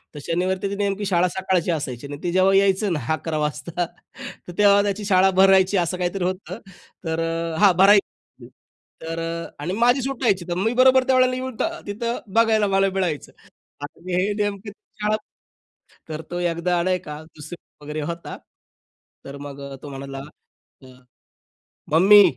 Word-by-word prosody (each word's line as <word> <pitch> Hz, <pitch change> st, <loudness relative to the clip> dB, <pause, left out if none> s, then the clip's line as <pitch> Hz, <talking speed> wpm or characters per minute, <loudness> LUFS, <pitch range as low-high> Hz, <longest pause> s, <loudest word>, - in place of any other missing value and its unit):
तर -, -, -6 dB
शनिवारी 185 Hz, +4 st, -1 dB
त्याची 200 Hz, +1 st, -3 dB
नेमकी 200 Hz, 0 st, -1 dB
शाळा 180 Hz, -2 st, +2 dB
सकाळची 185 Hz, -1 st, -1 dB
असायची 140 Hz, -5 st, -4 dB
आणि 145 Hz, 0 st, -7 dB
ते 175 Hz, -, -1 dB
जेव्हा 185 Hz, +1 st, +3 dB
यायचं 195 Hz, -1 st, +3 dB
ना 150 Hz, -, -1 dB
11 155 Hz, 0 st, -3 dB
वाजता 150 Hz, +4 st, -2 dB
तर 175 Hz, +1 st, -12 dB
तेव्हा 200 Hz, -1 st, +6 dB
त्याची 205 Hz, 0 st, -2 dB
शाळा 190 Hz, -1 st, +4 dB
भरायची 190 Hz, 0 st, +5 dB
असं 175 Hz, 0 st, 0 dB
काहीतरी 180 Hz, +1 st, -2 dB
होतं. 185 Hz, +1 st, -4 dB, 0.5 s
तर 160 Hz, 0 st, -2 dB, 0.4 s
हा 205 Hz, -1 st, +7 dB
भरायची 200 Hz, +2 st, +2 dB, 0.5 s
तर 165 Hz, 0 st, -5 dB, 0.4 s
आणि 160 Hz, +6 st, -3 dB
माझी 245 Hz, +5 st, +3 dB
सुट्टायची 245 Hz, -8 st, 0 dB
तर 175 Hz, -, -1 dB
मी 220 Hz, +5 st, 0 dB
बरोबर 260 Hz, +1 st, +5 dB
त्यावेळेला 255 Hz, -1 st, +3 dB
येऊन 255 Hz, -1 st, -5 dB, 0.3 s
तिथं 235 Hz, +4 st, -3 dB, 0.2 s
बघायला 220 Hz, -2 st, +3 dB
मला 195 Hz, 0 st, +2 dB
मिळायचं. 175 Hz, -6 st, -2 dB, 0.5 s
आणि 170 Hz, +5 st, -7 dB
हे 185 Hz, +3 st, +1 dB
नेमकं 205 Hz, 0 st, -3 dB, 0.3 s
शाळा 210 Hz, +1 st, +2 dB, 0.9 s
तर 155 Hz, 0 st, -5 dB
तो 175 Hz, -, -3 dB
एकदा 175 Hz, 0 st, 0 dB
नाई 185 Hz, 0 st, +1 dB
का, 150 Hz, -3 st, -8 dB
2रीत 155 Hz, 0 st, -13 dB
वगैरे 150 Hz, +1 st, -4 dB
होता. 170 Hz, +3 st, -6 dB, 0.9 s
तर 140 Hz, +1 st, -8 dB
मग 140 Hz, -1 st, -8 dB, 0.2 s
तो 145 Hz, -, -7 dB
म्हणाला, 135 Hz, 0 st, -7 dB, 0.6 s
"अ, 130 Hz, -, -13 dB, 1.1 s
मम्मी 195 Hz, +6 st, +8 dB
185 Hz, 150 wpm, -22 LUFS, 165-205 Hz, 1.1 s, मम्मी